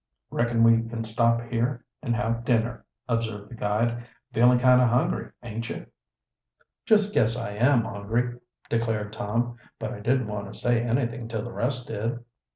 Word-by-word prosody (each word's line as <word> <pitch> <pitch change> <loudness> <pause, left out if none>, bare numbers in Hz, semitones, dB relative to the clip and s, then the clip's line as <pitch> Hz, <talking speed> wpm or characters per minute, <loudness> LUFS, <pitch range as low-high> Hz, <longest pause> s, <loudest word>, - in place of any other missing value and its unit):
"Reckon 120 -1 +2
we 115 0 +6
can 115 0 -3
stop 115 +1 +2
here 120 +1 -2 0.2
and 120 -5 0
have 115 0 -1
dinner," 120 0 0 0.2
observed 110 -4 -2
the - - -7
guide. 115 +3 0 0.3
"Feelin' 125 +2 +6
kind 125 0 +6
o' - - +5
hungry, 120 +1 +1
aint 115 0 -5
you?" - - -5 1.0
"Just 210 -2 +4
guess 115 - +3
I 115 -4 -4
am 120 +3 +3
hungry," 115 +4 -2 0.3
declared 110 -2 -1
Tom 120 +2 -1 0.2
"But 110 -1 -4
I - - -8
didn't 125 +4 +1
want 105 -2 -5
to - - -12
say 120 -1 +2
anything 120 -1 -1
till 110 -2 -3
the 120 - -6
rest 125 +1 -2
did." 115 +2 -2
115 Hz, 165 wpm, -26 LUFS, 110-120 Hz, 1.0 s, we